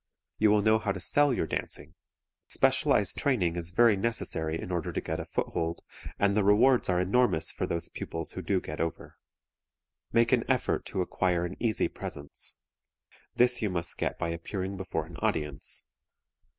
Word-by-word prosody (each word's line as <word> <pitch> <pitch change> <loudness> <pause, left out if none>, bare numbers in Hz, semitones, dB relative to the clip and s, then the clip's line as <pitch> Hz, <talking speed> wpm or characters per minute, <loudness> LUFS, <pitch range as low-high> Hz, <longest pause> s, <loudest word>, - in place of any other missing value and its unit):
You 110 - +5
will 105 0 +4
know 110 +1 +4
how 105 -2 -1
to 95 - -6
sell 145 +10 +4
your 120 - 0
dancing. - - -4 0.5
Specialized - - +2
training 95 -12 +1
is 85 -1 -3
very 110 +4 +5
necessary 80 -7 -2
in - - -6
order 85 -3 -2
to - - -2
get 80 +1 -4
a 80 - -5
foothold, 85 0 -2 0.3
and 100 0 +2
the 105 0 +2
rewards 115 +5 +4
are 90 -1 +2
enormous 95 -2 +2
for - - -3
those 85 0 -1
pupils 80 0 -4
who 95 - -5
do 95 +2 +1
get 75 -3 -6
over. 85 -1 -4 0.9
Make 115 0 +3
an - - +3
effort - - +1
to 95 - -2
acquire 90 -1 0
an 90 +2 -5
easy 115 -4 +1
presence. 70 0 -5 0.8
This 125 0 +4
you 105 - +1
must 85 -2 -1
get - - -1
by 85 - -2
appearing 95 +4 -4
before 90 -4 -3
an 80 0 -11
audience. 75 -3 -1
95 Hz, 175 wpm, -29 LUFS, 85-110 Hz, 0.9 s, You